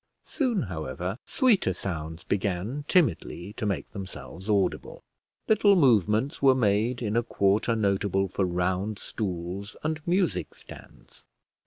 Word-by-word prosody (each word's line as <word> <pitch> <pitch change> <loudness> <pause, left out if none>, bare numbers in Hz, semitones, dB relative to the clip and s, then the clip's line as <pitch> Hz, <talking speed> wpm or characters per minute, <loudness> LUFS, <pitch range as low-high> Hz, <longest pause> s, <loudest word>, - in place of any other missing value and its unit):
Soon, 245 - 0
however, 90 +3 -4
sweeter 220 - +3
sounds 80 -3 -5
began 100 +8 -2
timidly 100 - +1
to 110 - -3
make 100 - -3
themselves 95 -1 -8
audible. 100 -3 0 0.4
Little 210 -2 +5
movements 115 - +3
were 135 -2 +6
made 115 +2 +1
in 105 -1 -1
a 120 - +4
quarter 110 0 +1
notable 100 -2 +1
for 95 +1 -2
round 90 +3 -1
stools 95 0 -5
and 155 0 -2
music 180 0 0
stands. - - -14
105 Hz, 125 wpm, -27 LUFS, 95-130 Hz, 0.4 s, were